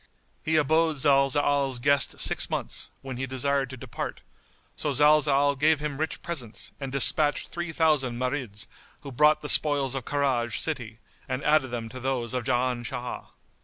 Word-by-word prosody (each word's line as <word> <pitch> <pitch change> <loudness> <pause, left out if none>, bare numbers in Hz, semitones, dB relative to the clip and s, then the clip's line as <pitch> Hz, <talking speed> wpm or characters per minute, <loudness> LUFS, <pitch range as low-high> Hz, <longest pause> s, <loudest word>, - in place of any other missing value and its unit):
He 160 - 0
abode 160 +1 +2
Zalzal's 140 -1 +2
guest 140 +2 +1
six - - +2
months, - - -3
when 130 -2 -6
he 135 +1 -3
desired 135 +1 0
to 130 - -8
depart; - - -6 0.5
so - - -2
Zalzal 145 -1 +4
gave 155 +1 +4
him 150 -2 -4
rich 160 +1 -3
presents 130 -10 -5
and 135 -2 -5
despatched 145 +2 +3
three 175 -1 -5
thousand 150 -7 +1
Marids, 125 -4 -3 0.4
who 140 - -8
brought 150 +5 +3
the - - -4
spoils 145 -4 +3
of 135 -3 -3
Karaj 130 -6 0
city 120 -8 -3 0.3
and 130 +2 -3
added 150 -2 +3
them 120 -2 -5
to 130 - -8
those 130 -2 -2
of 125 -2 -3
Jan 125 -1 0
Shah. 120 +1 -6
135 Hz, 165 wpm, -26 LUFS, 125-150 Hz, 0.5 s, Zalzal